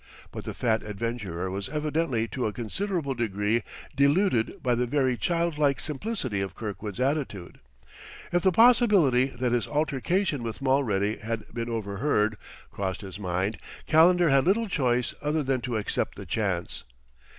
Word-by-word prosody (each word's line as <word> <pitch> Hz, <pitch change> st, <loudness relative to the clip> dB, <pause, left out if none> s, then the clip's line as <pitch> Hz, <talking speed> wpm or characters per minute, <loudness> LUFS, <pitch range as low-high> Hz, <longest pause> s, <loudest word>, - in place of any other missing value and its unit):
But -, -, -7 dB
the -, -, -5 dB
fat 110 Hz, -2 st, +1 dB
adventurer 105 Hz, -4 st, -4 dB
was 95 Hz, 0 st, -4 dB
evidently 150 Hz, -5 st, -1 dB
to 125 Hz, -4 st, -2 dB
a 105 Hz, -, -4 dB
considerable 150 Hz, -, -2 dB
degree 110 Hz, -1 st, 0 dB, 0.3 s
deluded 140 Hz, -, +3 dB
by 125 Hz, -, +2 dB
the 120 Hz, +1 st, 0 dB
very 130 Hz, -1 st, +1 dB
child 170 Hz, -, -1 dB
like 140 Hz, -2 st, +2 dB
simplicity 150 Hz, -, -3 dB
of 95 Hz, -3 st, -4 dB
Kirkwood's 105 Hz, 0 st, -6 dB
attitude. 130 Hz, -, -2 dB, 0.7 s
If 175 Hz, -, +2 dB
the 190 Hz, -, +4 dB
possibility 205 Hz, -, +5 dB
that 125 Hz, -2 st, -2 dB
his 120 Hz, -3 st, +1 dB
altercation 150 Hz, -, 0 dB
with 115 Hz, -2 st, -5 dB
Mulready 115 Hz, -7 st, +1 dB
had 115 Hz, 0 st, -4 dB
been 115 Hz, 0 st, -3 dB
overheard, 110 Hz, 0 st, 0 dB, 0.4 s
crossed 95 Hz, -1 st, -3 dB
his 95 Hz, -1 st, -8 dB
mind, 95 Hz, +1 st, -2 dB, 0.3 s
Calendar 175 Hz, +1 st, +5 dB
had 135 Hz, -1 st, +4 dB
little 220 Hz, +5 st, +2 dB
choice 125 Hz, -, +1 dB
other 150 Hz, +1 st, 0 dB
than 130 Hz, -2 st, 0 dB
to 120 Hz, -1 st, -2 dB
accept 105 Hz, -, -2 dB
the -, -, -7 dB
chance. 95 Hz, -6 st, -2 dB
125 Hz, 150 wpm, -27 LUFS, 105-150 Hz, 0.7 s, possibility